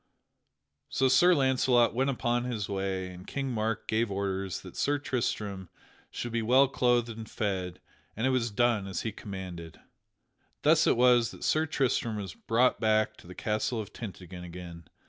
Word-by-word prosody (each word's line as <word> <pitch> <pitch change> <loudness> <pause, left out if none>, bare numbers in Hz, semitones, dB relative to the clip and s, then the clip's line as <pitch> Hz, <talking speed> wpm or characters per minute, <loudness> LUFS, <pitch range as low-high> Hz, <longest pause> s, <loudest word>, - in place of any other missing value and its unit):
So 135 - +2
Sir 175 +7 +6
Launcelot 130 -3 +3
went 135 +3 +1
upon 120 -2 0
his 115 -5 -3
way, 95 -1 -2
and 90 +1 -12
King 135 -2 -3
Mark 110 -1 -2
gave 110 +1 +1
orders 95 -1 -2
that - - -11
Sir 145 +1 +1
Tristram 105 - -3 0.4
should 120 - -5
be 115 0 0
well 130 +5 +5
clothed 120 -2 +2
and 110 -1 -8
fed, 95 -4 -3 0.4
and 110 - -1
it 130 - +3
was 125 -2 +1
done 110 -2 +1
as 95 -3 -4
he 110 - -2
commanded. 95 -6 -8 0.8
Thus - - +5
it - - +3
was 120 -2 +5
that - - -11
Sir 155 +1 +2
Tristram 125 -5 0
was 100 -5 -5
brought 120 +3 +2
back 110 0 +2
to - - -15
the 90 - -10
castle 110 +2 -1
of 105 -1 -7
Tintagel 90 -4 -8
again. 85 -1 -9
110 Hz, 170 wpm, -29 LUFS, 95-125 Hz, 0.8 s, Sir